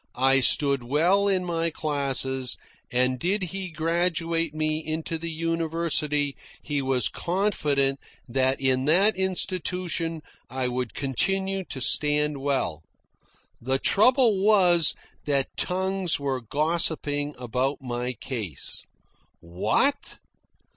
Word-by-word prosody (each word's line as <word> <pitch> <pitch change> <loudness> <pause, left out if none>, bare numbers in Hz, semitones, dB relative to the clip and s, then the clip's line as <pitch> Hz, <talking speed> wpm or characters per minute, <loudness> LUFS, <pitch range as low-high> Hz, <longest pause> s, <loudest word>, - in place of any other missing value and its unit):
I 135 +2 +4
stood 140 0 +3
well 170 +10 +2
in 185 -2 +1
my 165 -1 0
classes, 135 -4 0 0.3
and 125 +1 +1
did 190 +6 0
he 185 +1 -4
graduate 165 0 0
me 155 0 -1
into 160 +1 -3
the 165 +1 -5
university 160 -3 -1 0.3
he 145 -2 -1
was 130 -2 +1
confident 150 -8 0 0.3
that 130 +2 +1
in 130 -1 +2
that 195 +8 +4
institution 180 -3 -2 0.3
I 130 -1 -2
would 125 -1 -3
continue 190 +8 -1
to 135 - -7
stand 150 +2 +1
well. 135 - -1 0.8
The 130 +3 +1
trouble 220 - +4
was 180 -6 +5 0.3
that 140 -2 0
tongues 190 -2 -1
were 135 -2 -2
gossiping 150 +1 -1
about 125 +3 -1
my 125 -1 -3
case. 110 - -5 0.6
What! 105 - 0
150 Hz, 110 wpm, -25 LUFS, 135-175 Hz, 0.8 s, was